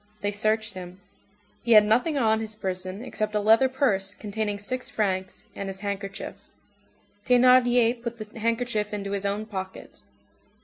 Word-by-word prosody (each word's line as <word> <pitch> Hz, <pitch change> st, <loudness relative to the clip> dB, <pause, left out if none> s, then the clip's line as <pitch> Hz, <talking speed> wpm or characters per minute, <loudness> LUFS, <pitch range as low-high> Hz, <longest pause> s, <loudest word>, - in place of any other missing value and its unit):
They 205 Hz, -, 0 dB
searched 215 Hz, +1 st, 0 dB
him. 185 Hz, 0 st, -9 dB, 0.6 s
He 235 Hz, -1 st, +3 dB
had 210 Hz, -1 st, +8 dB
nothing 250 Hz, +8 st, +2 dB
on 220 Hz, -4 st, +3 dB
his 220 Hz, -1 st, -5 dB
person 185 Hz, 0 st, -4 dB
except 215 Hz, -3 st, -2 dB
a -, -, +3 dB
leather 225 Hz, +5 st, +5 dB
purse 200 Hz, -8 st, 0 dB
containing 210 Hz, -1 st, -3 dB
six 250 Hz, +5 st, -3 dB
francs, 190 Hz, -3 st, -2 dB
and 195 Hz, -, -5 dB
his 195 Hz, 0 st, -7 dB
handkerchief. 200 Hz, -1 st, -4 dB, 0.9 s
Thénardier 245 Hz, -1 st, +5 dB
put 235 Hz, -1 st, -5 dB
the 215 Hz, +1 st, -9 dB
handkerchief 230 Hz, -2 st, -1 dB
into 200 Hz, -1 st, -4 dB
his 200 Hz, 0 st, -1 dB
own 205 Hz, +2 st, -2 dB
pocket. 190 Hz, -3 st, -7 dB
215 Hz, 150 wpm, -26 LUFS, 200-235 Hz, 0.9 s, had